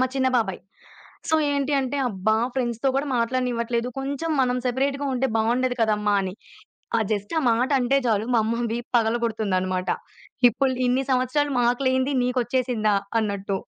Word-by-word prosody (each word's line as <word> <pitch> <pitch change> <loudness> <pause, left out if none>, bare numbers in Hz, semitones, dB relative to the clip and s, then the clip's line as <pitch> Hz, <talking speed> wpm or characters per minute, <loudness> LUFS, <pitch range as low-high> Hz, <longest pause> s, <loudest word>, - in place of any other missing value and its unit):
మా 255 - +4
చిన్న 260 -1 +2
బాబాయి. 190 -5 -2 0.7
సో, 320 - +4 0.2
ఏంటి 285 0 0
అంటే 265 +1 -2
"అబ్బా! 210 +2 0 0.2
ఫ్రెండ్స్‌తో 240 0 -1
కూడా 280 +2 0
మాట్లాడనివ్వట్లేదు. 235 0 -1
కొంచెం 280 +4 -3
మనం 250 -1 +1
సెపరేట్‌‌గా 275 +3 -1
ఉంటే 255 +1 +1
బావుండేది 245 +3 +1
కదమ్మ" 210 -1 +1
అని. 185 -1 -4 0.7
ఆ - - 0
జస్ట్ 205 +4 -3
ఆ - - +2
మాట 245 +5 +1
అంటే 265 +3 +2
చాలు. 215 -2 +1
మా 225 - +5
అమ్మ 230 +2 -1
వీపు 240 +1 -5
పగలగొడుతుందనమాట. 215 -5 -1 0.6
ఇప్పుడు 260 +3 0
ఇన్ని 255 +2 +1
సంవత్సరాలు 270 +3 +1
మాకు 245 +2 +1
లేంది 260 +2 +1
నీకొచ్చేసిందా 245 -3 0 0.3
అన్నట్టు. 200 -2 -2
245 Hz, 150 wpm, -24 LUFS, 220-260 Hz, 0.7 s, మా